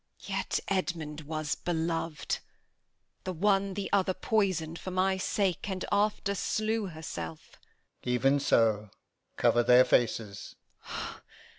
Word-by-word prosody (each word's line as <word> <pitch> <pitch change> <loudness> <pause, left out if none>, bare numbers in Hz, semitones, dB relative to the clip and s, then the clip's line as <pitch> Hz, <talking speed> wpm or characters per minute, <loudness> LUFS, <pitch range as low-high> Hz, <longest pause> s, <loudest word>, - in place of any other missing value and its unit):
Edm. - - -12
Yet - - 0
Edmund 165 -5 -2
was 155 0 -2
belov'd. 165 -2 -2 0.8
The 185 - -3
one 195 +2 +2
the 200 -1 -2
other 190 -2 +3
poisoned 180 -7 0
for - - -6
my 185 +1 +2
sake, 190 0 0
And 190 -1 -3
after 205 0 +2
slew 215 +1 0
herself. 85 - -7
Alb. - - -21
Even 135 +3 +3
so. 110 -5 +3 0.5
Cover 120 - +4
their 125 +1 +7
faces. 110 -4 0
170 Hz, 120 wpm, -30 LUFS, 140-195 Hz, 0.8 s, their